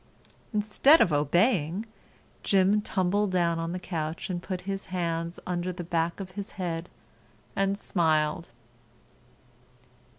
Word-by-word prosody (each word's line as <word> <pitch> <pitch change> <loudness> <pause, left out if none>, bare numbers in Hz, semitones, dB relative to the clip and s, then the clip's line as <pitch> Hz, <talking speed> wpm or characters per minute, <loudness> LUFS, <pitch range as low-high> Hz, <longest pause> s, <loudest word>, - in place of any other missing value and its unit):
Instead 215 +8 +5
of 170 - +4
obeying, 170 - +2 0.6
Jim 195 +2 +3
tumbled 200 +1 +1
down 170 -2 +1
on 165 0 -2
the 180 - -3
couch 165 -1 -4
and 175 -1 -3
put 185 0 -4
his 195 +1 -4
hands 170 -2 -2
under 180 0 -2
the 180 0 -6
back 170 +1 -1
of 190 -2 -6
his 200 +1 -7
head 175 -2 -4 0.7
and 195 0 +1
smiled. 160 -3 +1
180 Hz, 125 wpm, -28 LUFS, 165-195 Hz, 0.7 s, Instead